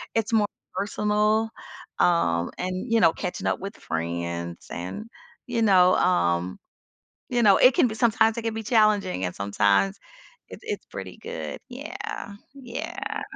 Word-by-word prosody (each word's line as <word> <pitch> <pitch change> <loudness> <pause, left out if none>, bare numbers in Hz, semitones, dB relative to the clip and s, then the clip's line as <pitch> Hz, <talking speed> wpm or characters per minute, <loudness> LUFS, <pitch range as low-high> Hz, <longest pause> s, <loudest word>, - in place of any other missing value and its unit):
it's 225 0 0
more 215 -2 +4 0.3
personal. 210 +2 +1 0.5
Um, 85 - +2
and, 185 +6 -3
you 230 - +4
know, 165 -6 +5
catching - - -4
up - - 0
with 200 +2 -7
friends 85 +1 -4
and, 90 - -5 0.4
you 240 -2 -1
know, 185 -4 +5
um, 85 - +1 0.7
you 245 -1 +1
know, 200 -3 +7
it 255 - +6
can 250 - +4
b 220 - -5
sometimes 225 -1 +3
it 235 - -3
can 225 -1 -1
be 225 - -4
challenging 210 - +2
and 90 - -3
sometimes 100 -1 +2 0.5
it's - - -10
it's - - -4
pretty 95 -2 -8
good. 75 -2 -6
Yeah, - - -8 0.6
yeah, 275 +6 -6
yeah. 430 - -4
195 Hz, 155 wpm, -25 LUFS, -, 0.7 s, know